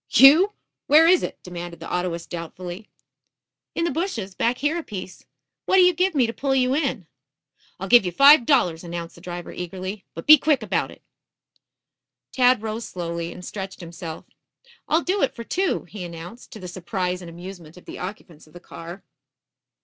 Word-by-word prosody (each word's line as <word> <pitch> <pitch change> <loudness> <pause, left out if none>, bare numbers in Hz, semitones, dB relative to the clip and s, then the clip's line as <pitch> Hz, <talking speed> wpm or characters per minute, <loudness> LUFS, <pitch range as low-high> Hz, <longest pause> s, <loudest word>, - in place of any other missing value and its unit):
"You? 315 +10 +7 0.3
Where 310 +3 +7
is 365 +1 +5
it?" - - -4
demanded 175 -1 -7
the - - -8
autoist 175 -2 -3
doubtfully. 175 +3 -7 0.9
"In 335 - 0
the 340 - 0
bushes, 260 - -3
back 235 +6 0
here 295 +3 0
a - - -3
piece. 185 -6 -8 0.4
What'll 380 -1 +6
you 360 - +5
give 365 +1 +1
me 260 -4 +4
to 230 - -3
pull 270 +4 -1
you 255 0 +2
in?" 260 - -1 0.7
"I'll 195 - -4
give 240 +2 +7
you 180 - -2
five 275 - +7
dollars," 175 - +2
announced 170 -1 -6
the 170 - -16
driver 175 -1 -7
eagerly. 185 +3 -6
"But - - -7
be 305 -1 +9
quick 305 -1 +2
about - - -1
it." - - -15 1.3
Tad 250 -3 +3
rose 220 +1 -4
slowly 170 -1 -4
and 180 0 -10
stretched 195 -2 -6
himself. 170 -2 -8 0.6
"I'll 320 +2 +2
do 385 +3 0
it 275 - +1
for 235 - -7
two," 375 +9 -1
he 205 -4 -9
announced, 175 +7 -9
to 220 - -9
the 185 - -8
surprise 180 0 -3
and 175 - -9
amusement 175 -1 -10
of 180 - -15
the - - -9
occupants 180 -5 -8
of 155 - -21
the 175 - -11
car. 175 +2 -10
190 Hz, 185 wpm, -23 LUFS, 175-270 Hz, 1.3 s, be